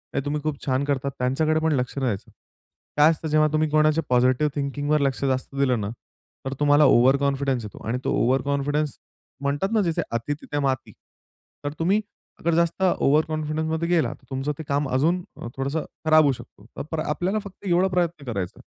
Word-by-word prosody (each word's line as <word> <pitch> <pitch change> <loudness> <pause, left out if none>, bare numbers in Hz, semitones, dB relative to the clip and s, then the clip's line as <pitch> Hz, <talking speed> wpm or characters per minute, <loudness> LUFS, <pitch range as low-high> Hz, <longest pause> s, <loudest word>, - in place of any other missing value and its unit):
"हे - - +1
तुम्ही 150 +1 -1
खूप 155 -3 -3
छान 130 0 +1
करतात." 140 -1 -1
त्यांच्याकडे 155 +5 +1
पण 160 0 +1
लक्ष 125 0 -2
नाही 135 - 0
द्यायचं. 100 -5 -3 0.7
काय 150 +1 +7
असतं 160 0 -4
जेव्हा 155 0 +4
तुम्ही 155 0 +2
कोणाच्या 155 +1 +3
पॉझिटिव्ह 125 +4 +3
थिंकिंगवर 145 +1 0
लक्ष 135 -1 0
जास्त 130 0 -1
दिलं 130 -4 +2
ना, 100 - -3 0.6
तर 135 - -2
तुम्हाला 145 0 +5
ओव्हरकॉन्फिडन्स 135 0 +3
येतो. 105 - -9
आणि 120 +3 0
तो - - +1
ओव्हरकॉन्फिडन्स 140 +3 0 0.4
म्हणतात 140 +7 0
ना, 220 - +4
"जिथे 170 -4 0
अति 115 +5 -1
तिथे 145 - -3
माती." 135 -2 -1 0.7
तर 145 - -1
तुम्ही 190 +6 +2 0.4
अगर 170 +1 0
जास्त 170 +2 +1
ओव्हरकॉन्फिडन्समध्ये 155 -1 +1
गेला, 170 -3 +2
तर - - -21
तुमचं 135 +2 -2
ते - - -4
काम 140 0 0
अजून 160 +8 +1 0.2
अ, - - -5
थोडंसं 140 +4 -2 0.2
खराब 155 0 +6
होऊ 145 - +4
शकतो. 105 -4 -13
तर - - -3
पर 160 - -1
आपल्याला 175 +7 -1
फक्त 200 0 -12
एवढा 180 +1 +3
प्रयत्न 175 -5 -1
करायचा 95 -5 -3
आहे. - - -15
145 Hz, 185 wpm, -24 LUFS, 135-160 Hz, 0.7 s, काय